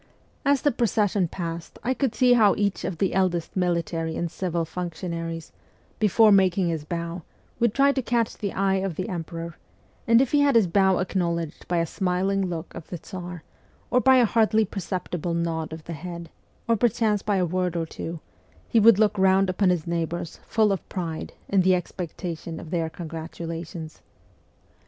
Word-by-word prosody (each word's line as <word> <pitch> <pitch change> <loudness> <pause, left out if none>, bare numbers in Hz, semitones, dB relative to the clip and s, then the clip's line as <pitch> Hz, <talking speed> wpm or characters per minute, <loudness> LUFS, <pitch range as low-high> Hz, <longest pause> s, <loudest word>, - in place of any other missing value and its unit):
As 280 -2 +2
the 290 - +4
procession 210 -6 +1
passed 165 -1 -6
I 255 +2 +1
could 260 -4 -1
see 250 -1 +5
how 215 -4 +5
each 200 -2 -1
of 175 - -3
the 190 +3 0
eldest 180 -3 0
military 170 -3 -1
and 170 -1 -2
civil 170 -3 -2
functionaries, 165 -1 -5 0.5
before 215 +1 +5
making 190 -2 +4
his 160 -3 -2
bow, 170 +2 -4 0.4
would 235 -2 +3
try 275 0 +5
to 275 - -1
catch 235 -2 0
the 200 -2 -3
eye 195 0 +1
of 190 -3 -2
the 185 - -3
emperor, 165 -1 -5 0.5
and 230 0 +6
if 260 -1 +2
he 290 - +4
had 285 -2 +4
his 225 -3 +6
bow 190 +1 +3
acknowledged 170 -3 -2
by 175 - 0
a 165 - +2
smiling 190 +2 0
look 170 -1 -5
of 170 - -9
the 175 - -5
Tsar, 175 -1 -8 0.5
or 250 - +4
by 265 +1 +6
a 245 - +6
hardly 220 0 +3
perceptible 180 -3 -3
nod 165 -1 -2
of 160 0 -8
the 170 - -6
head, 170 +1 -7 0.4
or 230 - +4
perchance 220 -2 +1
by 210 -1 0
a 185 -2 +2
word 180 0 -1
or 165 -1 0
two, 165 +1 -6 0.5
he 230 - +3
would 220 -1 +7
look 210 -1 +3
round 190 0 +4
upon 185 +1 +2
his 175 -3 0
neighbours, 170 -1 -3
full 215 -2 +3
of 195 - -3
pride, 165 -4 -4
in 195 -1 +3
the 185 0 +4
expectation 170 -2 -5
of 160 - -10
their 165 -3 0
congratulations. 165 0 -7
180 Hz, 180 wpm, -25 LUFS, 170-205 Hz, 0.5 s, would